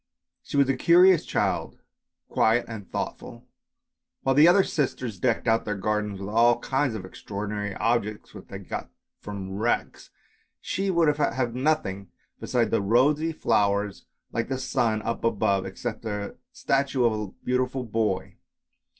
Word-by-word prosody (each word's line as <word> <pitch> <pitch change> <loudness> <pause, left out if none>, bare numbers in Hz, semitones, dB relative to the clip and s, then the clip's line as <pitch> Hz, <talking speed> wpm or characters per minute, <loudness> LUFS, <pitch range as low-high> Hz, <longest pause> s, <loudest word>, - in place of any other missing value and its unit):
She - - -5
was 140 -1 +5
a 135 - +1
curious 175 +4 +6
child, - - -1 0.5
quiet 115 +2 +2
and 105 -4 -8
thoughtful, - - -4
and - - -16 0.8
while 135 - +2
the 150 +4 +7
other 190 +3 +6
sisters 125 - -2
decked 120 -1 0
out 115 0 +3
their 105 - -3
gardens 105 0 -1
with 100 +1 -5
all 115 +2 +4
kinds 135 -3 -1
of 95 -4 -6
extraordinary 105 +1 -5
objects 110 -3 -1
which - - -11
they - - -7
got - - -6 0.3
from 100 -2 -7
wrecks, 120 +2 -1 0.5
she 195 +1 -2
would 165 -5 +3
have 130 -4 0
nothing 125 - -1 0.3
besides - - 0
the - - +2
rosy 145 +10 +3
flowers 100 -7 0 0.2
like 115 0 -2
the 135 - -1
sun 115 -4 0
up 115 - -3
above, 100 -4 +1
except 110 +4 -5
a 105 -2 -4 0.2
statue 135 -2 0
of 115 - +3
a 105 -1 -3 0.2
beautiful 125 +1 0
boy. 110 -4 -2
115 Hz, 150 wpm, -26 LUFS, 105-135 Hz, 0.8 s, the